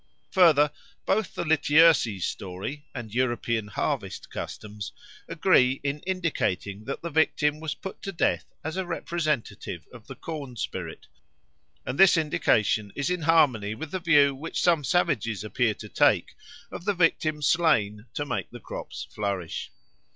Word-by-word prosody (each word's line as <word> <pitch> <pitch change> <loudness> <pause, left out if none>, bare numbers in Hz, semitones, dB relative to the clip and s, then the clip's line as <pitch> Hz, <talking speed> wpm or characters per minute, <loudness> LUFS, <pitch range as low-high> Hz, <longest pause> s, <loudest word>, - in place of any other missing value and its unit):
Further, 155 -6 +5 0.3
both 205 0 0
the - - -2
Lityerses 150 - +4
story 100 +11 -5
and 115 -4 -7
European 120 -3 0
harvest 105 - -3
customs 105 -1 -6 0.4
agree 130 +1 +3
in 140 +1 -1
indicating 110 - -2
that 135 - -5
the 170 - -4
victim 150 -1 +2
was 155 -2 -4
put 190 - -8
to 195 - -4
death 175 - 0 0.2
as 160 +3 -4
a 190 - -1
representative 165 -6 -3
of - - -13
the - - -8
corn 145 -6 -7
spirit, - - -5 0.8
and 130 - -4
this 195 -3 +7
indication 110 -9 +1
is 145 +4 -1
in 180 -1 -1
harmony 135 -10 +3
with 155 +6 -7
the 185 - -2
view 145 -5 +5
which 150 +5 -5
some 165 -4 +3
savages 130 - 0
appear 110 0 0
to 105 - -9
take - - +2 0.4
of 170 - -8
the 205 -1 +1
victim 155 -3 +1
slain 115 -11 +2
to 145 - -2
make 125 - -3
the 120 - -10
crops - - -7
flourish. 100 -5 -3
145 Hz, 150 wpm, -26 LUFS, 110-165 Hz, 0.8 s, this